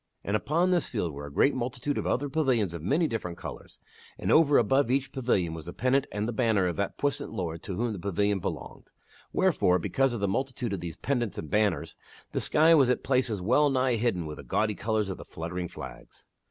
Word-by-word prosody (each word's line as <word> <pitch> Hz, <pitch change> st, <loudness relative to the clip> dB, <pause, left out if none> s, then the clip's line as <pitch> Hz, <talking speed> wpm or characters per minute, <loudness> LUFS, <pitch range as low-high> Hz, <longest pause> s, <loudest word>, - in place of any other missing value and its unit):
And 100 Hz, -, -1 dB
upon 170 Hz, +10 st, +1 dB
this 175 Hz, -3 st, +1 dB
field 90 Hz, -9 st, -2 dB
were 70 Hz, +1 st, -7 dB
a -, -, -10 dB
great 135 Hz, -, +3 dB
multitude 130 Hz, +3 st, -2 dB
of -, -, -2 dB
other 145 Hz, +3 st, 0 dB
pavilions 130 Hz, -, +1 dB
of 85 Hz, -, -6 dB
many 145 Hz, -, +2 dB
different 90 Hz, -, -3 dB
colors, -, -, -9 dB, 0.4 s
and -, -, -1 dB
over 150 Hz, -3 st, +6 dB
above 135 Hz, +3 st, +3 dB
each 135 Hz, +1 st, 0 dB
pavilion 100 Hz, -10 st, 0 dB
was 80 Hz, 0 st, -8 dB
the 90 Hz, -, -6 dB
pennant 135 Hz, +2 st, +1 dB
and 105 Hz, +1 st, -2 dB
the -, -, -1 dB
banner 110 Hz, -5 st, +2 dB
of 90 Hz, -, -1 dB
that 100 Hz, -1 st, -2 dB
puissant 145 Hz, -1 st, -1 dB
lord 85 Hz, -6 st, -4 dB
to 95 Hz, -, -5 dB
whom 115 Hz, +3 st, -1 dB
the 100 Hz, -, -6 dB
pavilion 100 Hz, +2 st, 0 dB
belonged. -, -, -6 dB, 0.4 s
Wherefore,, 90 Hz, 0 st, +3 dB
because 135 Hz, +9 st, +1 dB
of 120 Hz, -, -3 dB
the 100 Hz, -, 0 dB
multitude 125 Hz, +1 st, -2 dB
of 100 Hz, -, -2 dB
these 85 Hz, -2 st, -6 dB
pennants 120 Hz, -8 st, -1 dB
and 80 Hz, -, -6 dB
banners 105 Hz, -4 st, +1 dB, 0.3 s
the -, -, -1 dB
sky 160 Hz, +2 st, +5 dB
was 140 Hz, -6 st, +5 dB
at 125 Hz, -, +1 dB
places 125 Hz, -7 st, +1 dB
well 145 Hz, +9 st, +4 dB
nigh 130 Hz, -2 st, +2 dB
hidden 105 Hz, -7 st, 0 dB
with 75 Hz, -1 st, -6 dB
the -, -, -9 dB
gaudy 105 Hz, 0 st, 0 dB
colors 105 Hz, +1 st, -1 dB
of 95 Hz, -, -4 dB
the -, -, -9 dB
fluttering 85 Hz, +2 st, -5 dB
flags. -, -, -11 dB
110 Hz, 220 wpm, -28 LUFS, 90-135 Hz, 0.4 s, over